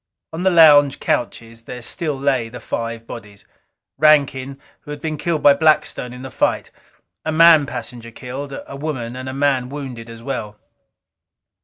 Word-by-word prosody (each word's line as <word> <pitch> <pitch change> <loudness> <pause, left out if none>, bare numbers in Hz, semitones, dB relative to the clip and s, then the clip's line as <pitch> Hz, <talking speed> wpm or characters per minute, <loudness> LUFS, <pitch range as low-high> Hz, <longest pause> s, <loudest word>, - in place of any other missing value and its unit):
On 165 - -4
the 190 - +3
lounge 150 -5 +6
couches 115 -1 -3
there 125 -1 -8
still 155 +1 -3
lay 135 -4 0
the 125 - -9
five 115 0 -5
bodies. 105 -4 -11 0.5
Rankin, 140 -3 +3 0.2
who - - -17
had 150 0 -6
been 155 +1 -3
killed 155 +1 -2
by 145 - +8
Blackstone 150 -4 +1
in 125 +1 -10
the 130 - -8
fight; - - -1 0.5
a 160 - -2
man 160 -2 +6
passenger 120 -1 -7
killed; 130 +4 -7
a - - -9
woman 135 -5 -5
and 130 +1 -6
a - - -6
man 135 -3 +1
wounded, 130 -5 -7
as 115 0 -11
well. 110 -6 -5
135 Hz, 165 wpm, -20 LUFS, 120-150 Hz, 0.5 s, by